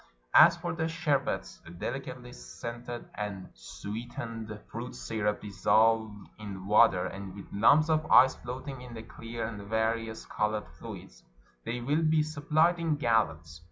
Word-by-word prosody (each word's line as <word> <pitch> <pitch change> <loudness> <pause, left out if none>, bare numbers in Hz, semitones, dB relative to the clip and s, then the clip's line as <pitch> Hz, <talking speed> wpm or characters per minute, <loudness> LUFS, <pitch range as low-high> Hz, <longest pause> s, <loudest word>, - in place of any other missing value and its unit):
As 170 +2 +8
for 170 0 -3
the 160 -1 -1
sherbets 145 - -1 0.2
(delicately 125 +1 -5
scented 120 - -7
and 100 -2 -5
sweetened 110 - -7
fruit - - -6
syrups 105 - -2
dissolved 110 +1 +2
in 100 -3 -7
water, 105 -3 +5
and 95 -1 -7
with 100 - -11
lumps 145 +10 +5
of 155 -1 +1
ice 130 +1 +7
floating 130 +2 -7
in 125 -2 -9
the 110 - -7
clear 115 0 -6
and 110 -2 -6
various 110 0 -1
colored 105 0 -1
fluids), - - -10 0.4
they 120 +1 -3
will 145 +6 +1
be 155 -1 +3
supplied 155 +3 +2
in 165 -2 +1
gallons. 85 - 0
115 Hz, 140 wpm, -30 LUFS, 105-140 Hz, 0.4 s, As